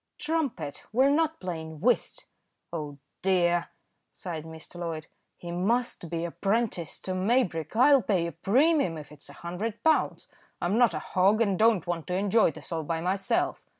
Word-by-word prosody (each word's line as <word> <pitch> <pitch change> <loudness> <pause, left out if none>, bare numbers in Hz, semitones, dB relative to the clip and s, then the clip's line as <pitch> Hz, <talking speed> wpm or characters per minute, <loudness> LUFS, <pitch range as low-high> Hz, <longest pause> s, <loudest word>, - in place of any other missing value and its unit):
"Trump 310 - -1
it! 145 -3 -6
we're 260 +5 +4
not 320 +1 +1
playing 160 -4 -6
whist." 240 +7 0 0.5
"Oh 150 -3 -5 0.2
dear!" 175 -2 +2 0.4
sighed 165 -5 -6
Mr. 160 +2 -10
Loyd. 165 -2 -4 0.3
"He 175 - -7
must 200 +1 0
be 170 +1 -2
apprenticed 195 -2 -2
to 185 - -1
Maybrick. 185 - 0
I'll 270 +3 +6
pay 185 -5 +1
a 170 - -3
premium 245 - +2
if 150 -1 -10
it's 150 -1 -10
a - - -11
hundred 205 +6 -4
pounds. 320 -1 +2 0.3
I'm 175 +4 0
not 235 -8 +4
a 155 - -6
hog, 195 +4 +4
and 200 -5 +1
don't 220 -5 +4
want 175 -2 -3
to 180 - -1
enjoy 205 +2 +3
this 160 - -11
all 165 -1 -1
by 165 +1 -2
myself. 190 +3 0
185 Hz, 170 wpm, -28 LUFS, 165-230 Hz, 0.5 s, I'll